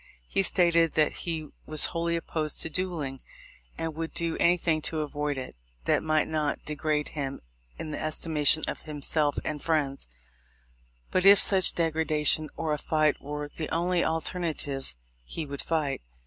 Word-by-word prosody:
He -, -, +1 dB
stated 170 Hz, -4 st, +4 dB
that 155 Hz, -1 st, +3 dB
he 160 Hz, -3 st, -4 dB, 0.2 s
was 155 Hz, -1 st, +5 dB
wholy 170 Hz, 0 st, 0 dB
opposed 155 Hz, -2 st, -2 dB
to 160 Hz, -, -4 dB
duelling, 155 Hz, -7 st, -2 dB, 0.6 s
and 165 Hz, -1 st, -3 dB
would 165 Hz, +1 st, -5 dB
do 170 Hz, -1 st, 0 dB
anything 170 Hz, -2 st, +2 dB
to 155 Hz, 0 st, -1 dB
avoid 145 Hz, -1 st, -2 dB
it 130 Hz, -, -6 dB, 0.3 s
that -, -, +2 dB
might 155 Hz, -1 st, +1 dB
not 155 Hz, -2 st, -2 dB
degrade 150 Hz, 0 st, -1 dB
him 140 Hz, -3 st, -4 dB, 0.4 s
in 155 Hz, -, -5 dB
the -, -, -4 dB
estimation 155 Hz, -1 st, +1 dB
of -, -, -4 dB
himself 150 Hz, -1 st, 0 dB
and 150 Hz, -2 st, -3 dB
friends; 145 Hz, -, -1 dB, 1.0 s
but, 185 Hz, -, +2 dB
if 200 Hz, 0 st, +8 dB
such 190 Hz, -2 st, +4 dB
degradation 155 Hz, -2 st, +1 dB
or 160 Hz, -2 st, -1 dB
a 150 Hz, -, -2 dB
fight 155 Hz, -2 st, +1 dB
were 145 Hz, +1 st, -5 dB
the 155 Hz, -, -4 dB
only 175 Hz, +1 st, +1 dB
alterna 165 Hz, 0 st, -1 dB
tives, 135 Hz, -, -2 dB, 0.3 s
he 155 Hz, -, -5 dB
would 140 Hz, -1 st, -4 dB
fight. 155 Hz, -4 st, -1 dB
155 Hz, 160 wpm, -28 LUFS, 150-165 Hz, 1.0 s, if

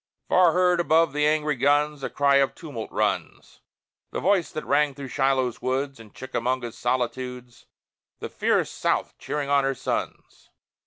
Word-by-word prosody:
Far 180 Hz, -3 st, +5 dB
heard 180 Hz, -1 st, +3 dB
above 165 Hz, -2 st, +3 dB
the 150 Hz, 0 st, +2 dB
angry 150 Hz, -1 st, +1 dB
guns, 145 Hz, +2 st, +2 dB
A -, -, -3 dB
cry 140 Hz, -1 st, +3 dB
of 140 Hz, -1 st, +2 dB
tumult 140 Hz, -10 st, -7 dB
runs: -, -, -2 dB, 0.5 s
The -, -, -4 dB
voice 190 Hz, -2 st, +1 dB
that 155 Hz, -, -5 dB
rang 145 Hz, -2 st, +2 dB
through 140 Hz, -1 st, -7 dB
Shiloh's 135 Hz, -3 st, 0 dB
woods, 135 Hz, 0 st, -2 dB
And 110 Hz, -2 st, -14 dB
Chickamauga's 125 Hz, -2 st, -3 dB
solitudes: 125 Hz, 0 st, -3 dB, 0.5 s
The -, -, -6 dB
fierce -, -, 0 dB
South -, -, -1 dB
cheering 145 Hz, -1 st, -3 dB
on 140 Hz, -1 st, +3 dB
her 135 Hz, 0 st, 0 dB
sons! -, -, -5 dB
140 Hz, 155 wpm, -25 LUFS, 130-150 Hz, 0.5 s, Far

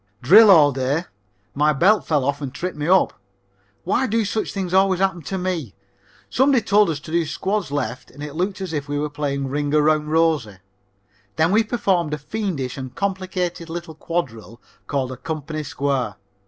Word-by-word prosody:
Drill 205 Hz, -, +8 dB
all 155 Hz, -6 st, +7 dB
day. 135 Hz, +5 st, -1 dB, 0.5 s
My 150 Hz, +2 st, +2 dB
belt 195 Hz, +10 st, +3 dB
fell 145 Hz, -5 st, +1 dB
off 140 Hz, +1 st, -1 dB
and 140 Hz, -2 st, -4 dB
tripped 180 Hz, +6 st, -4 dB
me 150 Hz, +1 st, -3 dB
up. 190 Hz, +2 st, +4 dB, 0.7 s
Why 245 Hz, +8 st, +1 dB
do 225 Hz, 0 st, +1 dB
such 215 Hz, +2 st, -2 dB
things 185 Hz, -3 st, -4 dB
always 190 Hz, -1 st, +3 dB
happen 190 Hz, -3 st, 0 dB
to 190 Hz, +6 st, -4 dB
me? 175 Hz, -, -3 dB, 0.5 s
Somebody 265 Hz, -2 st, +3 dB
told 205 Hz, -1 st, +4 dB
us 155 Hz, -3 st, -2 dB
to 155 Hz, -, -10 dB
do 170 Hz, 0 st, +2 dB
squads 190 Hz, +2 st, -2 dB
left 130 Hz, -3 st, -4 dB
and 145 Hz, +3 st, -10 dB
it 150 Hz, -1 st, -6 dB
looked 190 Hz, +4 st, -2 dB
as 185 Hz, -4 st, -4 dB
if 145 Hz, -2 st, -3 dB
we 145 Hz, -, -1 dB
were 150 Hz, 0 st, -2 dB
playing 140 Hz, -2 st, -2 dB
Ring 145 Hz, +1 st, -1 dB
Around 150 Hz, 0 st, +3 dB
Rosie. 155 Hz, -, +1 dB, 0.8 s
Then 160 Hz, +3 st, +2 dB
we 220 Hz, +3 st, +4 dB
performed 190 Hz, -9 st, 0 dB
a -, -, -8 dB
fiendish 150 Hz, -, -4 dB
and 130 Hz, -1 st, -7 dB
complicated 185 Hz, -3 st, -3 dB
little 170 Hz, -1 st, -6 dB
quadrille 125 Hz, -9 st, -4 dB, 0.3 s
called 135 Hz, -3 st, -2 dB
a 130 Hz, -, -7 dB
"company 155 Hz, +1 st, -5 dB
square." 135 Hz, -6 st, -2 dB
160 Hz, 180 wpm, -22 LUFS, 140-190 Hz, 0.8 s, Drill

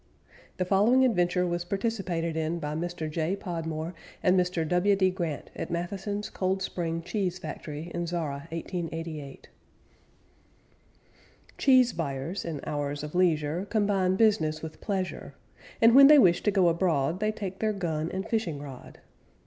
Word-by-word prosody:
The 185 Hz, -, 0 dB
following 215 Hz, +8 st, +4 dB
adventure 180 Hz, -5 st, +2 dB
was 175 Hz, 0 st, -1 dB
participated 185 Hz, -4 st, -2 dB
in 160 Hz, +1 st, -1 dB
by 150 Hz, -2 st, -4 dB
Mr. 170 Hz, 0 st, -3 dB
J. 160 Hz, +4 st, -1 dB
Podmore 165 Hz, -3 st, -4 dB, 0.3 s
and 180 Hz, 0 st, +4 dB
Mr. 180 Hz, -3 st, +1 dB
W. 180 Hz, +4 st, +3 dB
D. 190 Hz, -1 st, +2 dB
Grant 170 Hz, -5 st, -4 dB
at -, -, -5 dB
Matheson's 195 Hz, +4 st, -3 dB
Cold 190 Hz, 0 st, -1 dB
Spring 165 Hz, -3 st, -3 dB
Cheese 180 Hz, 0 st, -2 dB
Factory 155 Hz, 0 st, -7 dB
in 175 Hz, 0 st, -2 dB
Zorra, 155 Hz, -5 st, -3 dB
1888. 165 Hz, -4 st, -6 dB, 2.1 s
Cheese 255 Hz, -3 st, +5 dB
buyers 155 Hz, +4 st, -3 dB
in 160 Hz, -4 st, -5 dB
hours 145 Hz, 0 st, -3 dB
of 150 Hz, -, -6 dB
leisure 170 Hz, 0 st, +1 dB
Combine 200 Hz, -4 st, +2 dB
business 190 Hz, -8 st, +2 dB
with 155 Hz, -1 st, -8 dB
pleasure, 190 Hz, -3 st, -3 dB, 0.4 s
And 230 Hz, +1 st, +6 dB
when 275 Hz, +1 st, +10 dB
they 300 Hz, +1 st, +8 dB
wish 175 Hz, -10 st, +5 dB
to -, -, +2 dB
go 190 Hz, -3 st, +3 dB
abroad 170 Hz, -2 st, +1 dB
They 215 Hz, +1 st, +1 dB
take 195 Hz, -3 st, -6 dB
their 220 Hz, -1 st, +1 dB
gun 165 Hz, -5 st, -2 dB
and 190 Hz, +1 st, -4 dB
fishing 205 Hz, -11 st, -1 dB
rod. 140 Hz, -3 st, -10 dB
175 Hz, 150 wpm, -28 LUFS, 160-195 Hz, 2.1 s, when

